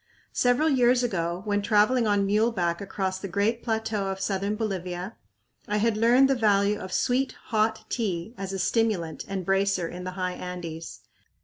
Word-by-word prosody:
Several 245 +5 +3
years 250 -3 +4
ago, 175 -5 -2
when 205 -1 +1
traveling 215 +3 +3
on 205 -1 +2
muleback 200 -5 +1
across 190 -1 -3
the 195 - -5
great 205 +5 0
plateau 220 -3 -1
of 195 0 -3
southern 195 +1 -1
Bolivia, 185 -2 -4 0.5
I 210 - 0
had 220 +1 +2
learned 240 +5 +5
the 270 - +3
value 210 -3 +2
of 185 - -7
sweet, 255 +6 +1 0.2
hot 220 0 +1
tea 200 -3 -2
as 195 -3 -5
a 195 - -3
stimulant 190 -5 0
and 195 -2 -4
bracer 195 -2 +1
in 180 +2 -7
the 185 0 -5
high 185 -1 -1
Andes. 170 -3 -7
200 Hz, 170 wpm, -26 LUFS, 185-225 Hz, 0.5 s, learned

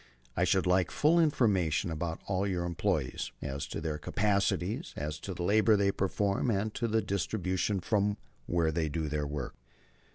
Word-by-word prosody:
"I - - +2
should 95 - +2
like 90 -1 +3
full 160 +3 +3
information 105 - +2
about 80 +1 -3
all 95 0 0
your 90 -3 -1
employees, 85 -5 -1
as 70 0 -4
to - - -4
their 80 -2 -3
capacities, 100 - 0
as 75 +1 -3
to 95 +2 -6
the 85 - -4
labor 110 +3 +4
they 100 0 +3
perform, 100 +4 0
as 105 0 0
to 120 - -1
their 110 0 +2
distribution 95 0 -1
from 100 +3 +1
and 105 0 -2 0.3
where 85 -2 +2
they 80 -1 0
do 80 +1 -2
their 75 -1 -1
work." 70 -3 -4
95 Hz, 175 wpm, -31 LUFS, 80-105 Hz, 0.3 s, labor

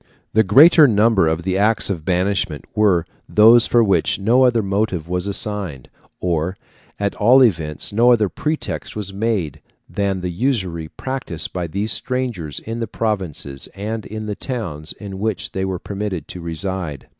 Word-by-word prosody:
The 110 - +5
greater 150 - +7
number 105 -5 +3
of 80 +2 -1
the 95 +1 -1
acts 105 0 +2
of 85 -5 -4
banishment 90 -5 -1
were 100 -6 +2 0.2
those 115 +2 +6
for 120 -1 +4
which 100 -3 +1
no 120 +6 +3
other 120 -3 +2
motive 95 -4 -1
was 90 +2 -2
assigned, 100 - -1 0.3
or, 85 +1 -1 0.4
at 100 -1 -1
all 125 +5 +6
events, 80 -5 0
no 120 +3 +5
other 110 -4 +3
pretext 105 - -4
was 100 -2 -5
made, 100 -8 -2 0.3
than 100 -2 -2
the 90 0 -3
usury 90 - -2
practised 130 - -5
by 90 -2 -3
these 100 +6 -2
strangers 120 - -3
in 115 +1 -6
the 115 - -2
provinces 90 -11 -3
and 110 +2 -5
in 110 +1 -6
the 105 -1 -4
towns 90 - -5
in 95 -2 -8
which 105 -3 -2
they 95 - -3
were 95 -1 -2
permitted 95 -4 -5
to 90 - -7
reside. 85 -2 -4
100 Hz, 165 wpm, -20 LUFS, 85-110 Hz, 0.4 s, greater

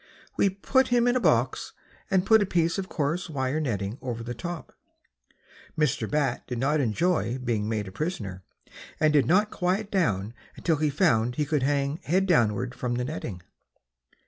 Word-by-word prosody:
We 200 - +3
put 260 +7 +1
him 245 0 +3
in 245 - +3
a - - +3
box - - +1 0.4
and 190 -1 +2
put 220 +1 +6
a - - +2
piece 170 0 +1
of 190 - -5
coarse 165 +4 -2
wire 135 0 -1
netting 110 -5 -2
over 120 -3 -4
the 120 +1 -4
top. 170 +7 -6 1.0
Mr. 150 -1 +1
Bat 145 -4 0
did 125 - -4
not 145 +5 +1
enjoy 130 +1 +1
being 115 -5 -1
made 105 -3 -2
a - - -8
prisoner, 105 - -4 0.6
and 155 -1 +3
did 145 -2 +4
not 205 +5 +3
quiet 195 +3 -1
down 110 - 0 0.2
until 165 -3 0
he 150 0 +1
found 125 - +2
he 150 - 0
could 150 -1 0
hang 140 +2 0
head 185 +4 +1
downward 125 - +2
from 125 -2 -3
the 125 0 -1
netting. 115 - -6
145 Hz, 175 wpm, -26 LUFS, 120-180 Hz, 1.0 s, put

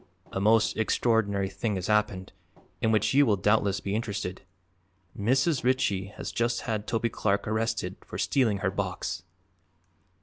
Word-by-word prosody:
"A - - -2
most 110 +2 +3
extraordinary 110 -3 +1
thing 105 +2 -2
has 95 -1 -3
happened, 105 -3 0 0.5
in 110 - +2
which 110 +2 +2
you 145 +2 +6
will 110 -7 +3
doubtless 100 0 +2
be 100 - -3
interested. 105 -4 -3 0.7
Mrs. 130 +7 +1
Ritchie 110 -7 +1
has - - -5
just 120 0 0
had 110 -3 -3
Toby 115 0 0
Clark 100 -2 0
arrested 110 -4 -1
for - - -8
stealing 115 -7 +2
her - - +2
box!" - - -3
110 Hz, 145 wpm, -28 LUFS, 100-115 Hz, 0.7 s, you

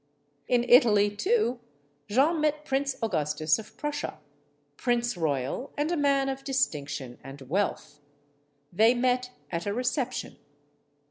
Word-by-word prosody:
In 240 -1 +2
Italy, 210 -5 +5
too, 315 - +1 0.5
Jeanne 295 +9 +2
met 300 0 0
Prince 275 -1 0
Augustus 155 -5 +1
of 220 - -12
Prussia, 295 0 -4 0.6
prince 240 -2 0
royal 150 - -2
and 305 +4 0
man 275 -1 +3
of 270 0 -4
distinction 145 - -2
and 135 +1 -10
wealth. 155 0 -2 0.7
They 225 +6 +5
met 250 0 +1 0.2
at 170 +2 -3
a 200 - 0
reception. 250 +1 -2
240 Hz, 120 wpm, -27 LUFS, 165-270 Hz, 0.7 s, Italy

